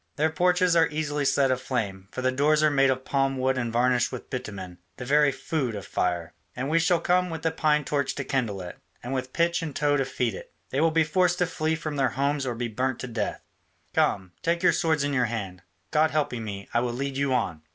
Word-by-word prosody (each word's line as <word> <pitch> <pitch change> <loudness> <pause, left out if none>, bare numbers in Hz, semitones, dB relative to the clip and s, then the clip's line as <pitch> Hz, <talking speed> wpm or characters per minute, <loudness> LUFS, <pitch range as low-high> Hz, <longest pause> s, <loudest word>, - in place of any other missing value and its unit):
Their 160 +2 +1
porches 180 +1 +3
are 165 -1 +5
easily 150 -1 -2
set 135 -1 +3
aflame, 110 -7 -2
for 130 - -5
the 130 - +3
doors 150 +3 +3
are 155 - +4
made 135 -1 +4
of 130 0 -1
palm 135 -1 +1
wood 130 +1 +1
and 120 -2 -2
varnished 125 +1 +2
with 125 - -8
bitumen, 100 -8 -6 0.2
the 125 - -6
very 145 +2 +4
food 135 -3 -2
of 100 - -6
fire. 85 -2 -1 0.2
And 135 +4 -3
we 165 - +4
shall 175 0 +3
come 180 +1 +2
with 160 -1 -6
the 165 - +2
pine 150 -2 +1
torch 140 -1 -1
to 135 - -3
kindle 115 -8 -1
it, 90 -1 -8 0.2
and 125 +2 -4
with 130 -1 -3
pitch 170 +2 +1
and 155 -4 -5
tow 145 0 +2
to 135 - +2
feed 125 -3 -1
it. - - -9 0.2
They 135 - +1
will 165 - +4
be 160 0 +3
forced 180 +3 +2
to 180 - +2
flee 160 -2 -1
from 155 -2 -4
their 135 -2 +2
homes 140 0 0
or 120 - -2
be 120 +1 -2
burnt 125 +3 -1
to 125 - -4
death. 110 -4 -3 0.5
Come, 95 -2 +1
take 170 +1 0
your - - +5
swords 160 -3 +1
in 145 0 -1
your 125 -3 +2
hand: 100 -6 -4 0.3
God 155 +1 +4
helping 145 -7 -1
me, 100 -2 -6
I 120 - +3
will 120 0 -1
lead 135 +2 -3
you 140 0 0
on. 95 -11 0
135 Hz, 240 wpm, -26 LUFS, 120-155 Hz, 0.5 s, are